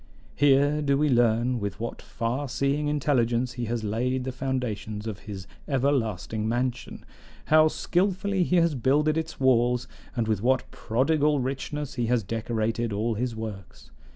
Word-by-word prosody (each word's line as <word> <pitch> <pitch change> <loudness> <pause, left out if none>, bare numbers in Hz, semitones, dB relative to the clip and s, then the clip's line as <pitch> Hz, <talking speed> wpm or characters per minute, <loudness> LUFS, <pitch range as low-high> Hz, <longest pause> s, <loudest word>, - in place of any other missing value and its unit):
Here 145 +1 +4
do 140 -2 +2
we 150 +1 +2
learn 120 0 +2
with 100 -1 -4
what 115 +1 -5
far 125 +4 -3
seeing 140 +3 0
intelligence 125 -4 +1
he 120 -1 -3
has 115 0 -2
laid 125 +5 -1
the 130 - -3
foundations 125 -5 -3
of 110 -3 -5
his 95 -3 -6 0.2
everlasting 115 - 0
mansion, 125 +1 -2 0.4
how 155 0 +6
skillfully 190 +4 0
he 180 +1 +2
has 170 -2 +4
builded 145 +4 +2
its 160 0 -3
walls, 125 -2 +3 0.3
and 115 -3 0
with 110 -3 0
what 130 +3 +1
prodigal 145 +5 +1
richness 140 +2 -3
he 120 -2 -1
has 120 -2 +2
decorated 115 +2 -2
all 110 +3 0
his 120 +2 -2
works. 105 -5 -8
125 Hz, 155 wpm, -26 LUFS, 115-145 Hz, 0.4 s, how